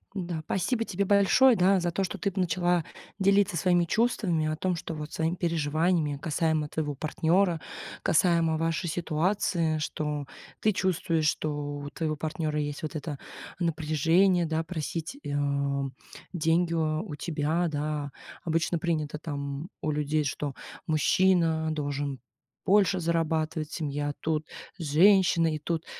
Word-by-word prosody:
Да, 175 Hz, -4 st, -3 dB
пасибо 225 Hz, +5 st, 0 dB
тебе 200 Hz, +1 st, -1 dB
большое, 205 Hz, +6 st, +5 dB
да, 190 Hz, +1 st, +4 dB
за 175 Hz, 0 st, 0 dB
то, 195 Hz, -, -1 dB
что 185 Hz, -, -3 dB
ты 200 Hz, -, -1 dB
начала 175 Hz, -2 st, +1 dB, 0.3 s
делиться 195 Hz, -1 st, +3 dB
своими 175 Hz, 0 st, +3 dB
чувствами 185 Hz, -7 st, +1 dB
о 155 Hz, -, -1 dB
том, 180 Hz, +2 st, -1 dB
что 165 Hz, -1 st, -5 dB
вот 150 Hz, 0 st, -6 dB
своими 165 Hz, +2 st, -1 dB
переживаниями 160 Hz, -2 st, 0 dB
касаемо 160 Hz, -1 st, 0 dB
твоего 150 Hz, -3 st, -2 dB
партнера, 165 Hz, +4 st, +1 dB, 0.4 s
касаемо 165 Hz, -1 st, +3 dB
вашей 165 Hz, +2 st, -1 dB
ситуации, 165 Hz, 0 st, 0 dB
что 150 Hz, -1 st, -3 dB, 0.4 s
ты 215 Hz, -, +3 dB
чувствуешь, 170 Hz, -4 st, 0 dB
что 155 Hz, 0 st, 0 dB, 0.3 s
у 145 Hz, 0 st, -6 dB
твоего 155 Hz, -1 st, -2 dB
партнера 155 Hz, 0 st, -2 dB
есть 145 Hz, +2 st, -3 dB
вот 155 Hz, +1 st, -4 dB
это 145 Hz, -2 st, -4 dB, 0.4 s
напряжение, 165 Hz, +3 st, +2 dB
да, 160 Hz, 0 st, -1 dB
просить, 165 Hz, -, -4 dB
э, -, -, -15 dB
тебя 140 Hz, -1 st, 0 dB, 0.4 s
деньги 165 Hz, +1 st, +2 dB
у 155 Hz, +1 st, -1 dB
тебя, 160 Hz, +2 st, -1 dB
да. 150 Hz, -1 st, -3 dB, 0.3 s
Обычно 165 Hz, 0 st, 0 dB
принято 155 Hz, -3 st, -2 dB
там 140 Hz, 0 st, -5 dB
у 155 Hz, -, 0 dB
людей, 150 Hz, +1 st, 0 dB
что 145 Hz, 0 st, -3 dB, 0.3 s
мужчина 160 Hz, +1 st, +3 dB
должен 145 Hz, -2 st, -3 dB, 0.5 s
больше 195 Hz, -1 st, +4 dB
зарабатывать, 160 Hz, -2 st, -1 dB
семья 145 Hz, -2 st, -2 dB
тут, 155 Hz, -1 st, -1 dB, 0.3 s
женщина. 170 Hz, +1 st, +4 dB
И -, -, -4 dB
тут 165 Hz, +2 st, -3 dB
160 Hz, 135 wpm, -28 LUFS, 150-175 Hz, 0.5 s, большое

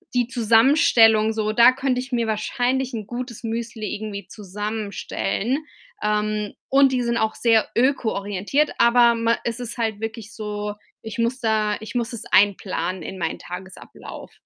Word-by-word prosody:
die 245 Hz, -1 st, +2 dB
Zusammenstellung 225 Hz, -2 st, +4 dB
so 215 Hz, -1 st, -1 dB
da 235 Hz, +3 st, +7 dB
könnte 265 Hz, -1 st, -1 dB
ich 260 Hz, +1 st, -10 dB
mir 235 Hz, -2 st, +1 dB
wahrscheinlich 245 Hz, +4 st, -1 dB
'n 215 Hz, -3 st, -4 dB
gutes 245 Hz, -1 st, -6 dB
Müsli 225 Hz, -2 st, -4 dB
irgendwie 200 Hz, -3 st, -6 dB
zusammenstellen, 210 Hz, +4 st, -3 dB, 0.4 s
ähm, 210 Hz, 0 st, -1 dB, 0.2 s
und 270 Hz, 0 st, +5 dB
die 250 Hz, -, +1 dB
sind 235 Hz, 0 st, 0 dB
auch 220 Hz, -1 st, 0 dB
sehr 225 Hz, -2 st, +3 dB
ökoorientiert, 235 Hz, +1 st, 0 dB
aber 235 Hz, 0 st, +5 dB
man 230 Hz, 0 st, +1 dB
es 235 Hz, +1 st, -3 dB
ist 245 Hz, 0 st, -5 dB
halt 220 Hz, -3 st, -1 dB
wirklich 225 Hz, -1 st, -6 dB
so, 210 Hz, -1 st, -5 dB, 0.3 s
ich 220 Hz, +1 st, -7 dB
muss 235 Hz, +3 st, 0 dB
da 215 Hz, -2 st, +1 dB
ich 220 Hz, -, -8 dB
muss 235 Hz, 0 st, -1 dB
es 230 Hz, -, -6 dB
einplanen 190 Hz, -2 st, +2 dB
in 190 Hz, -, -7 dB
meinen 165 Hz, -, -2 dB
Tagesablauf. 185 Hz, +1 st, -10 dB
225 Hz, 155 wpm, -22 LUFS, 210-240 Hz, 0.4 s, da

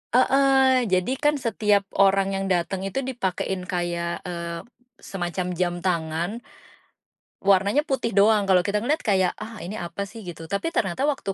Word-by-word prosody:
Heeh, 265 Hz, -1 st, +4 dB
jadi 185 Hz, +5 st, +1 dB
kan 295 Hz, 0 st, +2 dB
setiap 210 Hz, -5 st, +1 dB, 0.2 s
orang 195 Hz, 0 st, +4 dB
yang 195 Hz, 0 st, -2 dB
dateng 185 Hz, +1 st, 0 dB
itu 270 Hz, +7 st, -3 dB
dipakein 190 Hz, -6 st, -3 dB
kayak, 175 Hz, -1 st, -2 dB
eee, 170 Hz, -1 st, -5 dB, 0.4 s
semacam 180 Hz, -1 st, -3 dB
jam 175 Hz, 0 st, -1 dB
tangan, 170 Hz, +4 st, -1 dB, 1.0 s
warnanya 200 Hz, +7 st, +3 dB
putih 265 Hz, -, -2 dB
doang 205 Hz, +1 st, +4 dB
kalau 185 Hz, -2 st, +4 dB
kita 205 Hz, +3 st, -1 dB
ngeliat 285 Hz, +9 st, 0 dB
kayak, 190 Hz, -3 st, +2 dB
ah, 220 Hz, +1 st, -7 dB
ini 200 Hz, +1 st, -5 dB
apa 175 Hz, +4 st, -4 dB
sih 225 Hz, +3 st, -11 dB
gitu 165 Hz, -3 st, -8 dB
tapi 200 Hz, -, -2 dB
ternyata 265 Hz, -, 0 dB
waktu 200 Hz, -9 st, -2 dB
195 Hz, 155 wpm, -24 LUFS, 180-230 Hz, 1.0 s, Heeh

